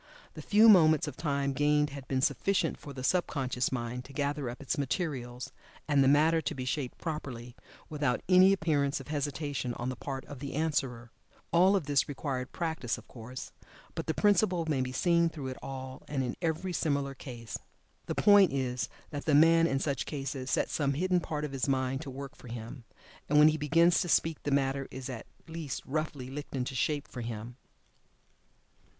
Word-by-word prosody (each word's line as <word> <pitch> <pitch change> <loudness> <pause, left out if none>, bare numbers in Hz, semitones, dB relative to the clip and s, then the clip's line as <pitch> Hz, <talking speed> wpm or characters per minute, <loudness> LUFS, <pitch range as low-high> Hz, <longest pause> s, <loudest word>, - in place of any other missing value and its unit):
The - - -8
few 215 +2 +5
moments 160 -8 +6
of - - -5
time 140 -3 -1
gained 150 +1 +2
had 140 -2 -8
been 130 -1 0
sufficient 190 -1 +1
for 145 - -9
the 130 -2 -7
sub 175 +6 +2
conscious 130 -3 -1
mind 125 0 -3
to 140 - -12
gather 145 -1 -1
up 120 - -7
its 145 +3 -2
materials, 130 -4 -3 0.4
and 145 -2 +4
the - - +4
matter 155 +4 +4
to 145 - -3
be 130 -1 -4
shaped 130 0 -3
properly, 130 -7 -5 0.3
without 145 -5 -1
any 185 +1 +7
appearance 150 -7 +1
of 135 - -11
hesitation 145 -4 -2
on 120 +1 -3
the 130 - -3
part 135 +1 -5
of 140 - -9
the 140 0 -5
answerer. 135 -7 -1 0.4
All 185 +4 +5
of 185 -7 0
this 145 -2 +1
required 135 -2 -3
practice, 160 -8 -2
of - - -14
course, 125 +1 -8 0.4
but - - -5
the 160 - 0
principle 200 -4 +3
may 145 -4 +1
be 130 0 -2
seen 170 +4 +3
through 145 -5 -6
it 130 - -6
all 130 0 -7
and 135 -3 -1
in 125 - -3
every 170 +2 -1
similar 140 -4 0
case. 120 -4 -7 0.5
The - - -2
point 205 -3 +6
is 125 -5 -2 0.2
that 145 -2 -5
the 150 - +3
man, 165 +2 +6
in 135 - 0
such 140 0 -2
cases, 135 -2 -4
sets - - 0
some 140 -2 +1
hidden 180 +3 +2
part 150 -3 -3
of 150 - -6
his 135 0 -1
mind 130 0 0
to 145 - -7
work 140 +2 -7
for - - -14
him, 115 +1 -8 0.4
and 150 - +3
when 150 +1 +8
he 155 - 0
begins 165 +4 +4
to 175 - -2
speak 165 -1 +2
the - - -3
matter 135 -1 +1
is 130 0 -6
at 115 -3 -7 0.2
least 160 -3 -5
roughly 140 -3 -3
"licked 145 0 -6
into 130 0 -2
shape 145 +3 -1
for 125 - -7
him." 115 +1 -6
140 Hz, 195 wpm, -30 LUFS, 130-160 Hz, 0.5 s, when